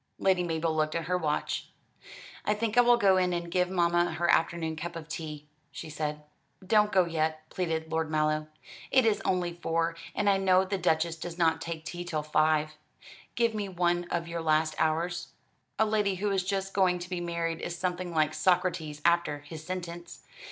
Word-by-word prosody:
Lady 190 Hz, -2 st, +2 dB
Mabel 165 Hz, -2 st, -1 dB
looked 155 Hz, 0 st, 0 dB
at 165 Hz, -1 st, -2 dB
her 180 Hz, -, 0 dB
watch. 155 Hz, -4 st, -1 dB, 0.8 s
"I 210 Hz, -, +1 dB
think 220 Hz, +1 st, -2 dB
I 245 Hz, -, +8 dB
will 240 Hz, 0 st, +5 dB
go 195 Hz, -4 st, +4 dB
in 180 Hz, -1 st, +2 dB
and 170 Hz, 0 st, -3 dB
give 180 Hz, 0 st, +2 dB
mamma 175 Hz, -1 st, +2 dB
her 175 Hz, +1 st, 0 dB
afternoon 160 Hz, -1 st, +1 dB
cup 170 Hz, +2 st, -6 dB
of 165 Hz, -2 st, -7 dB
tea," 155 Hz, -2 st, -6 dB, 0.3 s
she 155 Hz, -, -8 dB
said. 150 Hz, 0 st, -3 dB, 0.4 s
"Don't 210 Hz, +1 st, +4 dB
go 185 Hz, -2 st, +4 dB
yet," 155 Hz, -1 st, -2 dB
pleaded 160 Hz, -3 st, -2 dB
Lord 160 Hz, -1 st, 0 dB
Mallow, 155 Hz, 0 st, +1 dB, 0.4 s
"it 260 Hz, -2 st, +4 dB
is 220 Hz, -2 st, +2 dB
only 180 Hz, -2 st, 0 dB
four, 165 Hz, -1 st, -1 dB, 0.2 s
and 205 Hz, -, 0 dB
I 200 Hz, -1 st, +5 dB
know 190 Hz, -1 st, +4 dB
the 195 Hz, 0 st, -2 dB
Duchess 165 Hz, -1 st, +1 dB
does 170 Hz, +1 st, -7 dB
not 160 Hz, -2 st, +2 dB
take 165 Hz, -1 st, -5 dB
tea 175 Hz, 0 st, -5 dB
till 160 Hz, -4 st, -3 dB
five. 155 Hz, 0 st, +1 dB, 0.6 s
Give 235 Hz, -1 st, +2 dB
me 205 Hz, -2 st, -3 dB
one 175 Hz, -1 st, +1 dB
of 170 Hz, -1 st, -2 dB
your 170 Hz, 0 st, -4 dB
last 155 Hz, 0 st, +2 dB
hours. 170 Hz, +3 st, -1 dB, 0.4 s
A 220 Hz, -, +4 dB
lady 210 Hz, -2 st, +1 dB
who 200 Hz, +2 st, -1 dB
is 190 Hz, -2 st, +1 dB
just 195 Hz, 0 st, -2 dB
going 185 Hz, -2 st, +3 dB
to 175 Hz, 0 st, -7 dB
be 180 Hz, -1 st, -3 dB
married 170 Hz, -1 st, -2 dB
is 175 Hz, -, -4 dB
something 180 Hz, 0 st, -2 dB
like 155 Hz, -1 st, +1 dB
Socrates 175 Hz, -5 st, 0 dB
after 170 Hz, -4 st, +2 dB
his 155 Hz, +1 st, -9 dB
sentence. 175 Hz, -1 st, -6 dB
170 Hz, 195 wpm, -29 LUFS, 160-185 Hz, 0.8 s, I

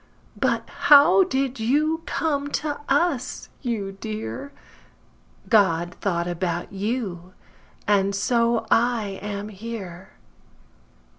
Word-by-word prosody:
But -, -, 0 dB, 0.2 s
how 295 Hz, +6 st, +8 dB
did 265 Hz, -5 st, -1 dB
you 305 Hz, +8 st, +1 dB
come 285 Hz, -3 st, -1 dB
to 290 Hz, -1 st, -2 dB
us, 275 Hz, -3 st, 0 dB
you 220 Hz, -6 st, -2 dB
dear? 220 Hz, +7 st, -6 dB, 1.0 s
God 175 Hz, -6 st, +3 dB
thought 170 Hz, -3 st, -1 dB
about 175 Hz, 0 st, -3 dB
you, 195 Hz, -4 st, -3 dB, 0.5 s
and 200 Hz, -1 st, +2 dB
so 235 Hz, +2 st, +1 dB
I 225 Hz, -5 st, +1 dB
am 205 Hz, 0 st, -5 dB
here. 195 Hz, -4 st, -8 dB
220 Hz, 95 wpm, -24 LUFS, 195-265 Hz, 1.0 s, how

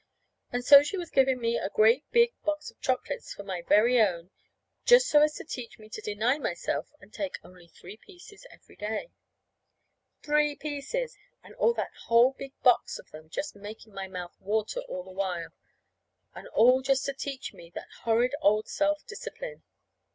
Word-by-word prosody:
And 245 Hz, 0 st, -3 dB
so 280 Hz, +2 st, +10 dB
she 295 Hz, +7 st, -3 dB
was 350 Hz, -2 st, -6 dB
giving 265 Hz, -1 st, +3 dB
me 235 Hz, 0 st, 0 dB
a -, -, -3 dB
great 225 Hz, +7 st, +3 dB
big 470 Hz, 0 st, +4 dB
box 305 Hz, 0 st, -2 dB
of -, -, -36 dB
chocolates 260 Hz, -, -2 dB
for 200 Hz, -, -8 dB
my 190 Hz, -3 st, -4 dB
very 230 Hz, +7 st, +4 dB
own, 180 Hz, -3 st, 0 dB, 0.5 s
just -, -, +6 dB
so 295 Hz, -10 st, +5 dB
as 300 Hz, 0 st, +3 dB
to -, -, -7 dB
teach 250 Hz, -7 st, -7 dB
me 215 Hz, -1 st, -15 dB
to 215 Hz, -, -7 dB
deny 220 Hz, +7 st, 0 dB
myself 175 Hz, -11 st, -2 dB
and 195 Hz, -, -18 dB
take 290 Hz, -2 st, -4 dB
only 180 Hz, -2 st, -16 dB
three 185 Hz, +4 st, -13 dB
pieces 400 Hz, -, -15 dB
every -, -, -19 dB
day. 220 Hz, -, -4 dB, 1.1 s
Three 295 Hz, 0 st, +2 dB
pieces! 300 Hz, -, -4 dB, 0.3 s
and -, -, -14 dB
all 470 Hz, -, +2 dB
that -, -, -3 dB
whole 235 Hz, +3 st, +5 dB
big 270 Hz, 0 st, -9 dB
box 250 Hz, -2 st, +3 dB
of -, -, -15 dB
them 155 Hz, 0 st, -12 dB
just 295 Hz, -, -4 dB
making 210 Hz, +1 st, -11 dB
my 195 Hz, -1 st, -5 dB
mouth 180 Hz, -2 st, -7 dB
water 215 Hz, -, -1 dB
all 180 Hz, -, -5 dB
the 185 Hz, -, -13 dB
while; 185 Hz, -3 st, -3 dB, 0.8 s
and -, -, -10 dB
all 255 Hz, -, +5 dB
just 265 Hz, 0 st, +1 dB
to 275 Hz, -, -2 dB
teach 270 Hz, 0 st, -6 dB
me 170 Hz, -, -14 dB
that -, -, -8 dB
horrid 235 Hz, +3 st, +2 dB
old 215 Hz, -1 st, +3 dB
self 300 Hz, 0 st, 0 dB
discipline! 480 Hz, +4 st, -8 dB
245 Hz, 180 wpm, -28 LUFS, 205-300 Hz, 1.1 s, so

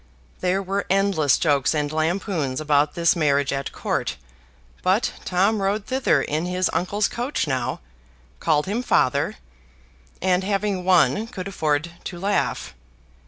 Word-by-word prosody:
There 185 Hz, +2 st, 0 dB
were 195 Hz, +2 st, -2 dB
endless 190 Hz, -8 st, +3 dB
jokes 145 Hz, -2 st, +2 dB
and 150 Hz, -1 st, -1 dB
lampoons 160 Hz, -3 st, -1 dB
about 150 Hz, 0 st, +2 dB
this 170 Hz, 0 st, +3 dB
marriage 145 Hz, -4 st, +2 dB
at 135 Hz, -1 st, -3 dB
Court: -, -, -2 dB, 0.6 s
but 195 Hz, +6 st, +1 dB
Tom 195 Hz, +4 st, +2 dB
rode 200 Hz, +2 st, 0 dB
thither 260 Hz, 0 st, +1 dB
in 155 Hz, +4 st, -2 dB
his 180 Hz, +1 st, 0 dB
uncle's 205 Hz, +3 st, +1 dB
coach 245 Hz, +5 st, -2 dB
now, 130 Hz, -5 st, -2 dB, 0.6 s
called 150 Hz, -1 st, +2 dB
him 210 Hz, +5 st, -1 dB
father, 140 Hz, -, +1 dB, 0.8 s
and 185 Hz, 0 st, +1 dB
having 195 Hz, -1 st, -1 dB
won 190 Hz, +4 st, +3 dB
could 185 Hz, -4 st, -6 dB
afford 155 Hz, -3 st, -1 dB
to 175 Hz, -, -5 dB
laugh. 200 Hz, +3 st, -1 dB
180 Hz, 135 wpm, -23 LUFS, 150-195 Hz, 0.8 s, endless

